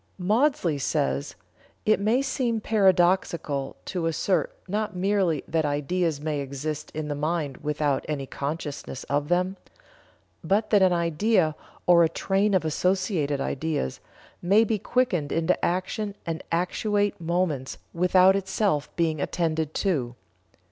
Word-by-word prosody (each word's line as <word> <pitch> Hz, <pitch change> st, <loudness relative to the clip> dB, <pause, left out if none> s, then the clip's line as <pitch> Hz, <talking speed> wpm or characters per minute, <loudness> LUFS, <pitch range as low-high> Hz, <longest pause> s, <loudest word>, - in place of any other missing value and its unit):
Maudsley 200 Hz, -, +1 dB
says: 70 Hz, -, -1 dB, 0.5 s
"It 215 Hz, -1 st, +4 dB
may 225 Hz, +6 st, +2 dB
seem 255 Hz, -4 st, -1 dB
paradoxical 180 Hz, -9 st, +2 dB
to 175 Hz, -3 st, -2 dB
assert 180 Hz, +3 st, 0 dB
not 210 Hz, +1 st, -2 dB
merely 185 Hz, -4 st, +1 dB
that 160 Hz, 0 st, 0 dB
ideas 150 Hz, +2 st, 0 dB
may 150 Hz, -1 st, -2 dB
exist 140 Hz, +2 st, -4 dB
in 155 Hz, -1 st, -3 dB
the 145 Hz, -, -2 dB
mind 150 Hz, -2 st, -2 dB
without 150 Hz, -2 st, -1 dB
any 140 Hz, -3 st, -2 dB
consciousness 140 Hz, -1 st, -5 dB
of 145 Hz, +1 st, -1 dB
them, 180 Hz, +3 st, +1 dB, 0.9 s
but 200 Hz, +6 st, +1 dB
that 205 Hz, -2 st, +5 dB
an 185 Hz, -1 st, +5 dB
idea, 170 Hz, 0 st, +2 dB, 0.3 s
or 175 Hz, -1 st, +6 dB
a 165 Hz, -, +3 dB
train 195 Hz, +3 st, +1 dB
of 180 Hz, -, +1 dB
associated 170 Hz, -3 st, 0 dB
ideas, 140 Hz, -, -2 dB, 0.4 s
may 200 Hz, +5 st, +4 dB
be 220 Hz, -1 st, 0 dB
quickened 185 Hz, -, 0 dB
into 165 Hz, +2 st, 0 dB
action 195 Hz, +3 st, -1 dB
and 165 Hz, -2 st, -4 dB
actuate 205 Hz, +4 st, 0 dB
movements 165 Hz, -6 st, -1 dB, 0.2 s
without 180 Hz, +2 st, +5 dB
itself 190 Hz, -5 st, 0 dB
being 160 Hz, -3 st, 0 dB
attended 160 Hz, -2 st, -1 dB
to. 135 Hz, -11 st, -1 dB
170 Hz, 130 wpm, -26 LUFS, 150-195 Hz, 0.9 s, or